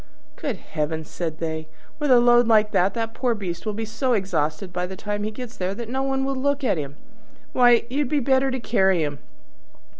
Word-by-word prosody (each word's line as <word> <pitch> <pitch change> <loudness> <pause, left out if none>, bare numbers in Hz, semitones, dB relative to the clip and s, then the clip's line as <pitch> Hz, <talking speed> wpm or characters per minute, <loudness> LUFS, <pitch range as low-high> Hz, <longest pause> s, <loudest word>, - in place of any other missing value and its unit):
"Good 275 -6 -3
heavens!" 160 -1 -4
said 160 -3 -3
they, 160 -1 -4 0.3
"with 295 -1 0
a 250 -2 +7
load 240 0 +5
like 215 -2 +4
that 190 +2 +2
the 225 -1 -1
poor 245 -2 0
beast 190 -1 -5
will 215 - 0
be 220 +2 -3
so 235 +4 -1
exhausted 180 -4 -1
by 180 0 -1
the 190 - -7
time 205 +2 -3
he 210 - -1
gets 240 +2 -8
there 185 +1 -2
that 230 +1 -6
no 265 +2 -1
one 270 0 0
will 275 0 -1
look 285 +2 0
at 210 -10 +1
him. 140 -1 -6 0.6
Why, 245 -2 +5
you'd 270 +2 -1
do 300 0 +2
better 265 +1 +2
to 260 0 -2
carry 190 -7 +2
him!" 145 -2 -3
220 Hz, 215 wpm, -24 LUFS, 180-255 Hz, 0.6 s, a